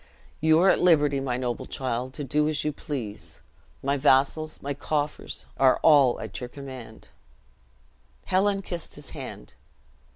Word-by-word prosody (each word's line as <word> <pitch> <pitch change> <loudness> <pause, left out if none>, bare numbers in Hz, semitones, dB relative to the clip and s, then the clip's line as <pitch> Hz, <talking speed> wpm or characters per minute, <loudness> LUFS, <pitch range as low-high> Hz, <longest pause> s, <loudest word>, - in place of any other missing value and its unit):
"You 160 0 +4
are 190 - +6
at - - +1
liberty, 150 -5 +4
my 130 -2 -2
noble 125 -2 -3
child, 130 0 -3
to 145 - -4
do 150 +3 +1
as 155 -2 -1
you 150 - -1
please. 125 -8 -6 0.4
My 140 +1 +1
vassals, 145 +3 +2
my 140 +1 -3
coffers, 145 +1 -3
are 130 -1 +5
all 140 -6 +6
at 100 -5 -6
your 125 - -6
command." 130 -5 -10 1.2
Helen 195 +1 +2
kissed 175 -3 -6
his - - -11
hand. - - -8
140 Hz, 150 wpm, -26 LUFS, 130-155 Hz, 1.2 s, are